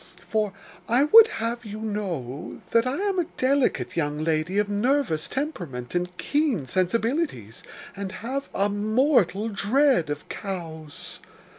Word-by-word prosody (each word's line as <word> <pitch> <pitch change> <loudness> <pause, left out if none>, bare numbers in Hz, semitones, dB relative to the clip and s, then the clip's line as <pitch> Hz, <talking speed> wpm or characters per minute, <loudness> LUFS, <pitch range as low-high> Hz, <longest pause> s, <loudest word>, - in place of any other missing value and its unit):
For 215 -2 0 0.4
I 245 +4 +4
would 450 +9 +9
have 235 - -3
you 215 -1 -7
know, 180 - -4
that 230 +2 +3
I 255 - 0
am 400 -2 0
a 345 - +1
delicate 255 - +1
young 150 -3 -1
lady 160 +4 0
of 210 0 +2
nervous 205 - +1
temperament 175 - -4
and 180 0 -2
keen 285 - 0
sensibilities, 185 - -1 0.3
and 195 -1 -5
have 260 +7 -4
a 200 - +1
mortal 215 - +2
dread 220 - +2
of 145 0 -5
cows. 160 -6 -7
205 Hz, 135 wpm, -25 LUFS, 165-260 Hz, 0.4 s, would